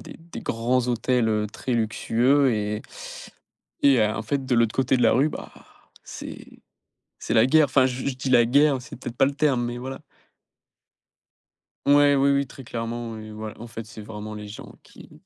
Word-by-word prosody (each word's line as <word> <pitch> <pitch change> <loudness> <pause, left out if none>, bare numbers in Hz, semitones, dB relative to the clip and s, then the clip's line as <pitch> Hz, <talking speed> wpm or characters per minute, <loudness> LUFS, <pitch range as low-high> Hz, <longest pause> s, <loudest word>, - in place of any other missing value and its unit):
a - - -11
des - - -15
des 170 +1 -10
grands 120 +2 0
hôtels, 120 0 +1
heu, 105 -1 0
très 125 - -4
luxueux 120 +4 +2
et 105 0 -2 1.0
et 140 -3 +5
heu, - - +5
en 110 - -3
fait 135 +5 -2
de 125 - +1
l'autre 115 -2 +2
côté 130 0 +2
de - - +1
la - - +5
rue, 135 +5 +3
bah, - - -8 0.5
c'est - - -9 0.7
c'est - - -3
la 110 0 +5
guerre. 155 +2 +5
Enfin 130 -1 +3
je 125 0 -5
je 140 - 0
dis 130 +1 -4
la 120 -2 +6
guerre, 140 +3 +3
c'est - - -10
peut-être 120 -1 -7
pas - - +5
le 140 - -1
terme, 140 -5 +1
mais 120 0 -4
voilà. 130 +3 -7 1.8
Ouais, 145 0 +5
oui 140 +1 +4
oui 140 0 +2
très 135 +1 -12
clairement 115 0 -4
ouais, 110 -1 -9
voil 110 0 -7
en 120 - -8
fait 115 -1 -8
c'est 110 0 -11
vraiment 105 0 -7
les 105 0 -7
gens 105 - -10
qui - - -16
120 Hz, 200 wpm, -24 LUFS, 110-135 Hz, 1.8 s, la